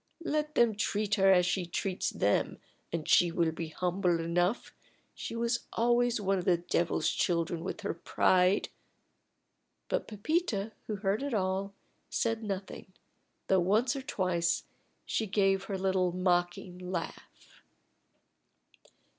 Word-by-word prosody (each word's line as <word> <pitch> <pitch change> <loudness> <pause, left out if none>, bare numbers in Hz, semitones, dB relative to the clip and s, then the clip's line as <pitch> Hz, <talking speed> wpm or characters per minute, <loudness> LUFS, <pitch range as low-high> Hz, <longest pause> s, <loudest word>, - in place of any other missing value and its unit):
Let 305 0 -1
them 235 -2 +4
treat 210 0 -1
her 195 -1 +5
as 180 -1 +5
she 180 -1 -1
treats 185 +2 -2
them, - - 0 0.3
and 165 -2 -3
she 175 -1 +5
will 165 -1 +1
be 160 0 -5
humble 180 +1 0
enough. 175 +6 0 0.4
She - - -6
was 235 0 -1
always 240 0 +2
one 195 -1 +1
of 175 - -5
the 175 -2 +4
devil's 170 -2 0
children 170 -1 0
with - - -5
her 200 - -2
pride!" 180 +2 +2 1.2
But - - -1
Pepita, 220 - -1 0.2
who 215 - -2
heard 200 +2 -1
it 280 -4 -2
all, 195 0 -1 0.3
said 225 -1 0
nothing, 195 -2 -6 0.5
though 190 - +3
once 215 +9 +2
or 275 - -3
twice 180 -8 0 0.4
she 220 - -1
gave 195 -1 +2
her 195 0 -3
little 185 -1 +1
mocking 180 0 0
laugh. 180 -2 -7
190 Hz, 135 wpm, -30 LUFS, 175-215 Hz, 1.2 s, her